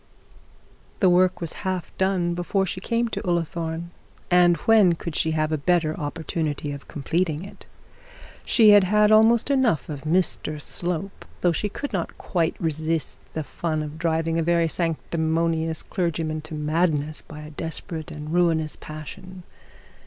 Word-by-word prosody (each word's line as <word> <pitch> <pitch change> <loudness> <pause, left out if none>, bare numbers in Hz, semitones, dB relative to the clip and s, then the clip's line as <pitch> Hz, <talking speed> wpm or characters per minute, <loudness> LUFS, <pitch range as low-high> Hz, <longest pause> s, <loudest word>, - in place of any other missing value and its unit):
The 185 -4 +5
work 185 +1 +3
was 165 - -2
half 185 -3 -3
done 185 -2 +1
before 185 +3 0
she 185 0 -4
came 235 +2 0
to - - -3
Ullathorne, 170 -1 -2 0.4
and 175 -1 +5
when 215 -6 +6
could 170 -1 -6
she 160 - +1
have 155 -1 0
a 155 - 0
better 160 0 +1
opportunity 150 -1 -3
of 140 0 -8
completing 165 +2 -1
it? 195 - -12 0.8
She 220 -3 +6
had 205 -2 +7
had 210 +2 +4
almost 225 +4 +5
enough 235 - +2
of 145 -2 -5
Mr 155 -2 0
Slope, 175 +5 -4 0.2
though 175 - +4
she 205 +5 -1
could 280 +5 -6
not 175 -4 -3
quite 165 -2 -1
resist 160 0 -2 0.2
the 160 - -1
fun 155 +1 -3
of 150 +1 -7
driving 165 0 0
a - - +2
very 170 0 +2
sanctimonious 165 0 -1
clergyman 160 -3 -2
to 155 - -7
madness 155 0 0
by 150 -1 -11
a 150 0 -9
desperate 160 +1 -5
and 150 +1 -6
ruinous 165 -3 +2
passion. 180 +4 -9
165 Hz, 155 wpm, -24 LUFS, 155-185 Hz, 0.8 s, had